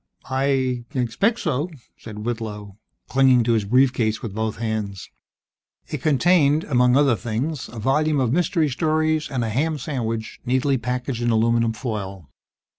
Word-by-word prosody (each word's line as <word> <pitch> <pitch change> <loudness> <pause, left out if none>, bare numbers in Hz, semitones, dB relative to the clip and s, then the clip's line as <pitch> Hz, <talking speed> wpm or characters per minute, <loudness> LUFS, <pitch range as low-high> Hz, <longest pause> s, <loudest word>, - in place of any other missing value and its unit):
"I 130 -2 0
I - - -1
expect 165 - +1
so," 155 0 -1 0.3
said 105 -1 -9
Whitlow, 105 -4 -5 0.3
clinging 130 -2 +4
to 115 +1 +2
his 110 -3 +1
brief 125 +4 +4
case 110 -1 -1
with 110 -5 -5
both 110 +1 -2
hands. 110 -4 -4 0.8
It 150 - -4
contained, 155 +1 +3
among 125 -2 +3
other 140 -4 +4
things, 120 - -3
a 115 - -11
volume 145 +6 +1
of 125 -2 +1
mystery 165 -2 +1
stories 155 +2 0
and 125 -3 -2
a 115 - -2
ham 150 +8 0
sandwich, 115 -6 -4
neatly 130 +1 +1
packaged 125 +1 -3
in 120 - +1
aluminum 115 0 +2
foil. 100 - -6
125 Hz, 155 wpm, -22 LUFS, 110-140 Hz, 0.8 s, clinging